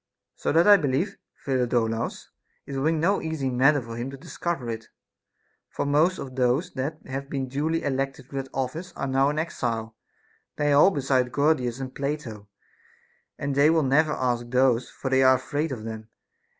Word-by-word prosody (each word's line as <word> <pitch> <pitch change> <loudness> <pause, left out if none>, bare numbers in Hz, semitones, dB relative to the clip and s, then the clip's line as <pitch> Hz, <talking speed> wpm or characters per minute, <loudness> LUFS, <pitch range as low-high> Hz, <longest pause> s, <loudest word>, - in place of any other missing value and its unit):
So - - -1
that 165 +2 +5
I 205 -1 +9
believe, 155 +5 -1 0.3
Phidolaus, 120 -4 -1 0.3
it 140 - -6
will 135 +1 -1
be 160 - +4
no 165 +5 +1
easy 155 -5 -2
matter 135 +4 +4
for 115 -2 -8
him 120 +3 -3
to 135 - -8
discover 170 -3 -4
it. 115 -1 -5 0.8
For - - -3
most 155 +6 +3
of 130 -2 -7
those 130 +8 +1
that 145 +4 -3
have 135 +1 -5
been 135 -2 -2
duly 155 +5 -1
elected 135 0 -3
to 140 - -5
that 135 0 -4
office 155 +7 -4
are - - -3
now 135 +1 +2
in 150 - -3
exile; 115 -8 -2 0.6
nay, 145 -1 +1
all 145 +7 +7
besides 135 -6 +1
Gorgidas 135 -3 +1
and 130 -1 -6
Plato; 140 -8 -4 0.9
and 140 -1 -2
they 140 +2 +5
will 160 -1 +3
never 150 +3 +3
ask 120 -3 -1
those, 125 -1 +2
for 130 - -5
they 130 0 +4
are 130 0 +6
afraid 145 +4 -2
of 120 -5 -5
them. 110 0 -7
135 Hz, 180 wpm, -25 LUFS, 125-150 Hz, 0.9 s, I